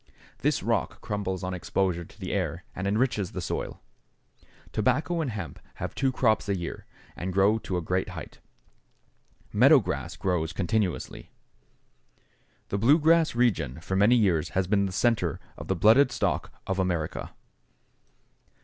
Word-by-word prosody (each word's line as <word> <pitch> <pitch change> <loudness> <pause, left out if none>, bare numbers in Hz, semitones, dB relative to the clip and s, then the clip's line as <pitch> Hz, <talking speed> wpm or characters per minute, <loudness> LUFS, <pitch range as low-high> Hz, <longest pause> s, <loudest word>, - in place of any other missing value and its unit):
This - - +1
rock - - -1
crumbles 95 -3 -3
on 90 0 -2
exposure 90 -1 -1
to 85 - -17
the 95 - -4
air 90 -3 -2
and 95 +2 -3
enriches 105 -2 0
the - - -3
soil. - - -4 0.9
Tobacco 165 +2 +1
and 150 - -1
hemp 100 -7 -6 0.2
have - - -5
two 135 -1 +1
crops 110 -5 +1
a 100 - +1
year 85 -2 -6 0.3
and 95 +2 -4
grow 100 +4 +3
to 95 -4 -3
a 90 - -3
great 90 +3 -1
height. - - -9 1.1
Meadow 135 +8 +7
grass 95 -8 -2
grows 85 -3 -1
continuously. 100 0 -2 1.4
The 100 - -1
Blue 135 +9 +6
Grass 160 -2 +3
Region 110 - +1
for 95 +4 -3
many 105 +5 +5
years 95 -9 +2
has 95 - +2
been 100 +1 +2
the - - -5
centre 95 -6 +1 0.2
of - - -9
the 95 - +1
blooded 110 +9 +5
stock 120 - -1
of 95 0 -2
America. 85 -4 -2
100 Hz, 150 wpm, -27 LUFS, 90-115 Hz, 1.4 s, Meadow